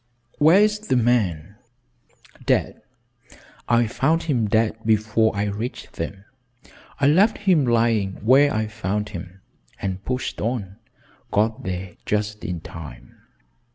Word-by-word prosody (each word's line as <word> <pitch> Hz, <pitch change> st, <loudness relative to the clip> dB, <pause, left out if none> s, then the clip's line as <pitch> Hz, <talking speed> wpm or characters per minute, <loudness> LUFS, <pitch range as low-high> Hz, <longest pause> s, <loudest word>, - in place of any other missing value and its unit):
"Where 160 Hz, +6 st, +6 dB
is 210 Hz, 0 st, +3 dB
the 215 Hz, -11 st, -1 dB
man?" 105 Hz, -7 st, +1 dB, 0.9 s
"Dead. -, -, +1 dB, 0.9 s
I 120 Hz, 0 st, +4 dB
found 155 Hz, +9 st, +1 dB
him 125 Hz, -9 st, 0 dB
dead 110 Hz, +1 st, +1 dB
before 110 Hz, 0 st, +2 dB
I 100 Hz, -, 0 dB
reached 105 Hz, +4 st, -5 dB
them. 95 Hz, +4 st, -6 dB, 0.7 s
I 140 Hz, -, +2 dB
left 190 Hz, +10 st, +4 dB
him 180 Hz, -10 st, +2 dB
lying 115 Hz, -4 st, +2 dB
where 140 Hz, +4 st, +6 dB
I 110 Hz, 0 st, 0 dB
found 105 Hz, -1 st, -3 dB
him, 95 Hz, -1 st, -9 dB, 0.4 s
and 95 Hz, 0 st, -4 dB
pushed 125 Hz, +3 st, -3 dB
on 105 Hz, -4 st, -3 dB, 0.5 s
got 110 Hz, +2 st, +1 dB
there 90 Hz, -1 st, -5 dB
just 105 Hz, 0 st, -1 dB
in 90 Hz, -3 st, -4 dB
time. 80 Hz, -2 st, -10 dB
110 Hz, 125 wpm, -23 LUFS, 100-130 Hz, 0.9 s, Where